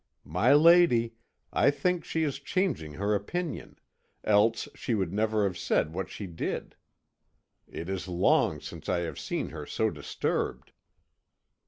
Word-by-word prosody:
"My 90 - +2
lady, 155 -8 +5 0.4
I - - +4
think 165 +4 0
she 160 0 -1
is 145 -3 -2
changing 175 - -1
her 100 +7 0
opinion 160 - -3 0.5
else 110 +2 +3
she 120 - -2
would 95 -4 -1
never 110 0 +1
have 95 -3 -1
said 80 - 0
what 95 +1 -3
she 105 - -6
did. 85 -3 -4 0.9
It 85 - -7
is 95 0 -4
long 90 -1 +2
since 80 -2 -8
I 90 -1 +1
have 85 - -5
seen - - -3
her - - -8
so - - 0
disturbed." - - -3
105 Hz, 145 wpm, -28 LUFS, 90-145 Hz, 0.9 s, lady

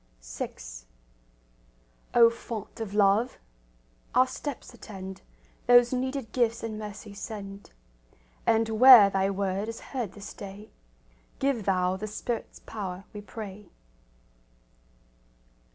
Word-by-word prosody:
VI - - -5 1.6
O 230 -1 +8
Font 230 -2 -7
of 210 -3 -5
love! 210 +4 +3 0.8
Our 255 - +6
steps 265 -1 -6
attend; 190 -4 -9 0.5
Those 245 0 +6
needed 260 -2 -2
gifts 230 -2 +1
in 220 -1 -4
mercy 210 0 -8
send; 200 -1 -8 0.8
And 225 0 +4
where 245 -6 +10
Thy 195 0 +1
word 195 +1 -1
is 230 - -6
heard 240 -8 -3
this 205 0 -9
day, 200 +2 -10 0.7
Give 270 -6 0
Thou 185 -1 +1
the 215 - -5
Spirit's 225 +2 -4
power, 195 -4 -6
we 210 - -7
pray. 205 -1 -9
215 Hz, 110 wpm, -28 LUFS, 195-235 Hz, 1.6 s, where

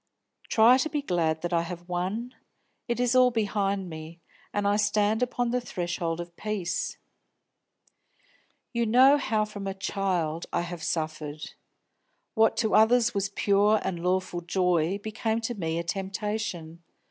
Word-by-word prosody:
Try 235 +4 +6
to 315 - 0
be 295 -2 -2
glad 160 - 0
that 175 0 -2
I 170 - +3
have 175 +1 -7
won; 190 +8 -3 0.5
it 235 -1 -1
is 245 0 +2
all 255 0 +6
behind 200 -4 -1
me, 160 0 -9 0.3
and 205 0 0
I 205 - +3
stand 210 +1 +2
upon 245 -1 0
the 250 0 0
threshold 175 -6 -3
of 170 0 -7
peace. 210 -4 -3 1.8
"You 235 -1 0
know 260 +6 +6
how 215 -4 0
from 205 -2 -7
a 195 - -3
child 180 -5 -2
I - - 0
have 175 -1 -6
suffered. 155 -2 -3 0.8
What 225 -2 +3
to 220 - +1
others 235 +2 +5
was 200 -1 -1
pure 205 +2 +3
and 175 -3 -3
lawful 180 -1 0
joy 180 0 +1
became 220 +2 -2
to 230 +2 -2
me 165 -6 -2
a 170 - -1
temptation. 190 -2 -4
195 Hz, 150 wpm, -27 LUFS, 175-220 Hz, 1.8 s, Try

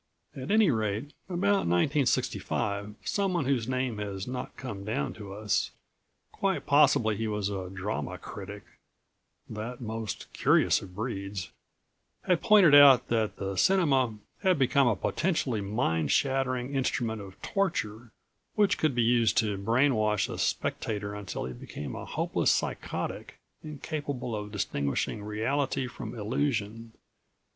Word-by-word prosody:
At 130 -1 -6
any 215 -5 +5
rate, 110 +4 -2 0.2
about 195 - +1
1965 100 - 0
someone 185 -7 0
whose 125 -4 0
name 130 -4 -1
has 100 -2 -4
not 125 0 -6
come 105 -7 -6
down 100 -9 -2
to 105 -3 -9
us 105 +1 0 0.6
quite 195 -1 -1
possibly 140 -7 +4
he 110 +2 -2
was 105 -2 -1
a 95 -2 -4
drama 95 +2 -4
critic, - - -8 0.8
that 110 +3 -6
most 110 -4 -5
curious - - +3
of 90 -1 -11
breeds 100 -4 -4 0.7
had 180 -3 +2
pointed 205 -8 +6
out 140 -3 +8
that 110 -2 0
the 95 0 -4
cinema 135 - +3 0.2
had 185 -4 +3
become 135 0 +3
a 115 - +3
potentially 135 - 0
mind 95 - 0
shattering 130 -1 0
instrument 120 -5 -1
of 95 -1 -11
torture, 120 - -2 0.5
which 205 -2 +3
could 155 -5 +1
be 120 - +3
used 115 -1 +3
to 105 -3 +2
brain 120 +8 +2
wash 105 -3 +1
a - - -5
spectator 105 -2 -2
until 105 -2 -5
he 65 - -5
became 70 +4 -7
a - - -6
hopeless - - 0
psychotic, - - -2 0.3
incapable 145 -5 -4
of 105 0 -5
distinguishing 90 -1 -2
reality 130 +6 -1
from 125 -2 -7
illusion. 115 -1 -2
115 Hz, 135 wpm, -29 LUFS, 105-140 Hz, 0.8 s, out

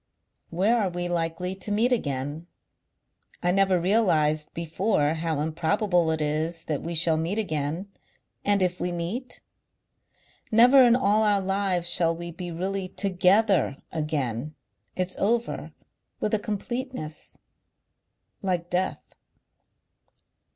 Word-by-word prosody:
"Where 210 +8 +2
are 195 - 0
we 175 0 -3
likely 175 +1 -2
to 195 +2 -6
meet 225 +5 +2
again?... 145 - -2 1.0
I 175 - +3
never 190 -1 +3
realized 160 -6 +2
before 165 -1 0
how 160 -2 -2
improbable 170 +3 +1
it 160 -1 -1
is 160 +2 -1
that 150 -3 -3
we 170 +1 -4
shall 160 -1 +5
meet 165 +6 -2
again. 160 -2 -2 0.6
And 200 -2 +3
if 180 0 -1
we 180 - -2
meet?... 195 +10 -4 1.1
"Never 245 +5 +7
in 240 -1 +6
all 215 -3 +3
our 205 -2 +3
lives 195 -2 0
shall 170 -1 +3
we 170 +1 -7
be 175 +1 -7
really 190 +3 -3
TOGETHER 190 -3 +2
again. 150 -3 -3 0.4
It's 185 0 -2
over 230 +3 -1 0.5
With 210 - -2
a 215 - +3
completeness.... 215 - -5 1.0
"Like 180 -3 -2
death." 180 +1 -1
180 Hz, 125 wpm, -26 LUFS, 160-205 Hz, 1.1 s, Never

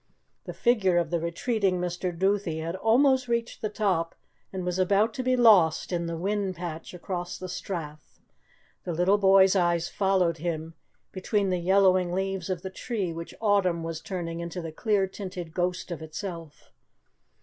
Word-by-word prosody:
The - - -6
figure 210 -8 +2
of 170 -3 0
the 170 - +1
retreating 185 +3 0
Mr. 180 +1 -2
Duthie 190 -1 0
had 165 +2 -3
almost 255 +5 +3
reached 235 0 -2
the 215 - -1
top 190 -6 -1 0.4
and 185 -2 -4
was 180 +1 -2
about 200 +4 +3
to 255 - -3
be 255 0 +2
lost 205 -12 +5
in 170 -1 -1
the 165 0 -3
whin 195 +1 -1
patch 170 0 -6
across 175 0 -5
the 185 - -7
strath. 160 -5 -7 0.6
The 175 - -3
little 180 +5 +3
boy's 195 0 +6
eyes 175 -2 +1
followed 185 -5 +1
him 165 -1 -3 0.4
between 195 +1 0
the 180 - 0
yellowing 185 0 +3
leaves 190 -1 -2
of 185 -1 -3
the 190 - -5
tree 195 -5 -3
which 165 +1 -8
autumn 195 -6 +2
was 165 -1 -5
turning 170 -3 -5
into 170 +1 -5
the 165 -2 -5
clear 200 +4 +1
tinted 185 -4 -7
ghost 180 +1 -2
of 165 - -5
itself. 165 -1 -8
185 Hz, 170 wpm, -27 LUFS, 170-200 Hz, 0.6 s, boy's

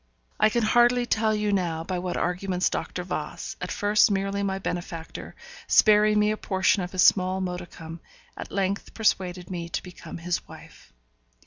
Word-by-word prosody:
I 215 - +5
can 235 +1 0
hardly 240 +2 +4
tell 220 -2 +1
you 210 -1 0
now 170 -4 -1
by 180 +1 -3
what 180 0 -3
arguments 180 +1 0
Dr. - - -3
Voss, - - -5
at - - -4
first 205 +1 +3
merely 195 0 -1
my 195 -1 -1
benefactor, 175 -3 -6 0.3
sparing 210 0 +5
me 210 0 +3
a 215 - -2
portion 190 0 +1
of 180 0 -5
his 185 - +2
small 185 0 +4
modicum, 175 -3 -6 0.4
at - - -8
length 195 0 -2
persuaded 185 -5 0
me 170 -2 -4
to - - -3
become 180 -2 -9
his 175 +1 -3
wife. - - -14
190 Hz, 165 wpm, -26 LUFS, 180-210 Hz, 0.4 s, I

